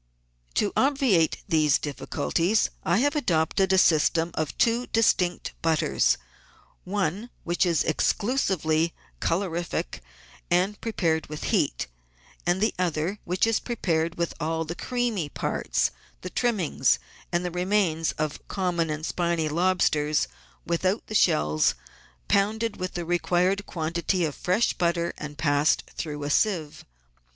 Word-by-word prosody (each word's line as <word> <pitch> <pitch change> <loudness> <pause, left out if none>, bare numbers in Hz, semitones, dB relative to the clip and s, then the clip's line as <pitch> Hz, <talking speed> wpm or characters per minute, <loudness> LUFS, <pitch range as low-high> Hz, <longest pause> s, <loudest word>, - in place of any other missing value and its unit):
To 205 - +1
obviate 260 - +2
these 155 -5 +3
difficulties 165 +7 0
I 170 +3 +2
have 290 +3 +2
adopted 190 - +1
a 190 - +4
system 165 0 +3
of 155 -2 -3
two 235 +1 +2
distinct 185 -5 +1
butters, 160 -2 +2 0.7
one 195 +3 -2
which 175 +2 +1
is 170 -3 +2
exclusively 170 - +1 0.2
colorific 170 - -2 0.5
and 185 +4 +1
prepared 165 -8 0
with 150 0 -7
heat, - - +1 0.6
and 175 +1 +2
the 220 - +2
other 180 +3 -1
which 180 +3 +1
is 225 -1 +2
prepared 170 -8 -1
with 170 0 -1
all 160 +1 -1
the 160 - -4
creamy 235 - -2
parts, - - -1 0.3
the 185 - -6
trimmings 200 - +1 0.3
and 175 0 0
the 180 - -2
remains 180 -3 +1
of 155 -1 -3
com 180 -3 -2
mon 165 -1 +1
and 155 +1 -3
spiny 170 -3 0
lobsters, 155 -3 +2 0.4
without 185 +4 0
the - - -8
shells, 75 - +3 0.5
pounded 215 +3 +1
with 185 0 -4
the 175 -1 -3
re 175 +1 +1
quired 185 +4 +1
quantity 170 +2 -1
of 150 - -3
fresh 185 +10 +1
butter 170 -1 0
and 150 -1 -7
passed 145 -1 +2
through 150 -2 -4
a 145 - -2
sieve. 165 -6 0
175 Hz, 135 wpm, -26 LUFS, 160-195 Hz, 0.7 s, a